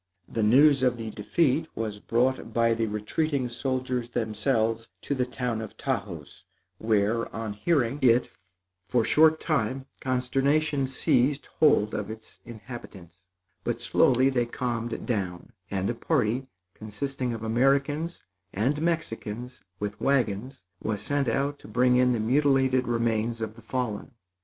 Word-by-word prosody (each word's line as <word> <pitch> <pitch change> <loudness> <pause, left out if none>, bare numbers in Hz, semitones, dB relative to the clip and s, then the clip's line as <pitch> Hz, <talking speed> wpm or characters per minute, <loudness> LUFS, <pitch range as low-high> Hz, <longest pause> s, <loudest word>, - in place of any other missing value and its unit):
The 115 - -2
news 135 +6 +6
of 125 -2 +2
the 110 -1 -5
defeat 140 +9 +1
was 110 -2 -3
brought 120 +2 0
by 115 -1 +4
the 115 0 0
retreating 125 +6 -1
soldiers 125 0 -2
themselves 115 0 0
to - - -1
the 130 -2 0
town 125 -3 -2
of 110 - -8
Taos, - - -4 0.4
where 110 +1 +1
on 110 -2 -3
hearing 135 +3 +1
it, 125 -1 +4 0.6
for 120 -3 +2
short 160 +1 +5
time, 130 -4 -1
consternation 135 +3 +1
seized 130 +2 +1
hold 125 -9 +4
of 105 -1 -3
its 110 0 -10
inhabitants; 100 -6 -11 0.4
but - - -2
slowly 130 +2 +3
they 120 -2 +1
calmed 120 -1 -3
down, 95 -7 -3 0.2
and 95 -1 -1
a - - 0
party, 125 -1 0 0.3
consisting 125 +4 -4
of 115 -1 -5
Americans 140 +8 +1 0.3
and 135 +9 0
Mexicans 125 -7 -3 0.2
with 105 0 -4
wagons, 130 -3 0 0.2
was 105 -2 -2
sent 145 +2 0
out 140 +5 0
to - - -13
bring 125 +3 +3
in 125 0 +4
the 120 - 0
mutilated 130 +1 +2
remains 115 -1 0
of 110 -1 -4
the 115 - -15
fallen. 120 -1 -3
120 Hz, 140 wpm, -27 LUFS, 110-135 Hz, 0.6 s, news